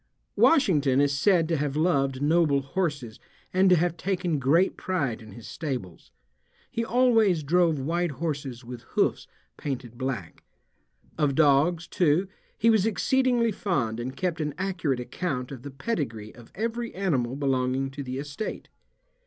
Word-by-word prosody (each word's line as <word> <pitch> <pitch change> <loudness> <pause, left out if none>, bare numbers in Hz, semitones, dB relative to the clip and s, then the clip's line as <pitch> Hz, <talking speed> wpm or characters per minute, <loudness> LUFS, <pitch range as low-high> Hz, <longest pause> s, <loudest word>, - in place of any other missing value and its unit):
Washington 150 - +4
is 140 0 +2
said 165 +3 +3
to 165 -1 0
have 145 -1 -2
loved 140 -5 +1
noble 150 -3 +3
horses 145 -7 -3 0.3
and 190 +1 +4
to 180 - +7
have 175 0 0
taken 180 -4 -1
great 160 +8 +3
pride 140 -12 -2
in 110 -3 -12
his 115 +1 -11
stables. 125 - -5 0.6
He 230 - -1
always 225 -8 +3
drove 165 +1 +3
white 165 +4 -1
horses 140 -4 -4
with 120 -1 -8 0.2
hoofs - - +1 0.3
painted 125 -4 -5
black. 125 -10 -4 0.8
Of 145 -3 +2
dogs, 155 +3 +3
too, 175 +2 +2 0.3
he 230 +2 +4
was 220 -1 +3
exceedingly 245 +1 +2
fond 135 - -1
and 130 +3 -5
kept 175 -2 -1
an 150 -1 -3
accurate 180 -8 -1
account 125 0 -4
of 130 -3 -8
the 140 - -7
pedigree 135 - -4
of 120 -1 -15
every 230 +2 -3
animal 135 -11 0
belonging 135 -1 0
to 140 +1 -6
the 130 -1 -5
estate. 145 +9 -5
150 Hz, 150 wpm, -26 LUFS, 135-180 Hz, 0.8 s, to